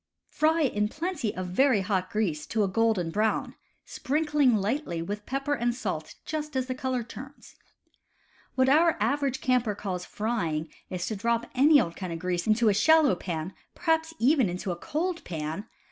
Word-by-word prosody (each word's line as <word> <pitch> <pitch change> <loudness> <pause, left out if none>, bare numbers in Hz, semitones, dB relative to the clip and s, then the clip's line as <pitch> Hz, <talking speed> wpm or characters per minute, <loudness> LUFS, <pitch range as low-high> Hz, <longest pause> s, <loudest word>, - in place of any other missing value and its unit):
Fry 320 +2 +2
in 210 -6 +1
plenty 320 - -3
of 185 -1 -4
very 245 +2 +3
hot 190 -2 -1
grease 170 -9 -1
to 215 -1 +1
a - - +2
golden 200 -4 +1
brown, 215 +4 0 0.3
sprinkling 295 -3 +1
lightly 210 - -1
with 205 +5 -5
pepper 275 +2 -1
and 240 -3 0
salt 160 -9 -4
just 300 -2 -4
as 260 -1 +1
the 255 - -3
color 255 -1 -2
turns. 265 +4 -11 1.0
What 260 0 +3
our 320 +4 +4
average 280 -2 0
camper 250 -5 +1
calls 185 -3 -4
"frying" 170 -9 -2 0.2
is 180 -2 -3
to 220 - -3
drop 235 +3 0
any 285 +3 +6
old 170 -8 -1
kind 185 -3 -5
of 165 - -3
grease 175 +1 -2
into 220 +2 +3
a 210 - +5
shallow 300 +8 +5
pan 175 0 -4 0.2
(perhaps 325 -1 0
even 265 - +3
into 180 +2 -3
a - - -2
cold 340 - -3
pan!) 160 +5 -5
230 Hz, 175 wpm, -27 LUFS, 185-280 Hz, 1.0 s, any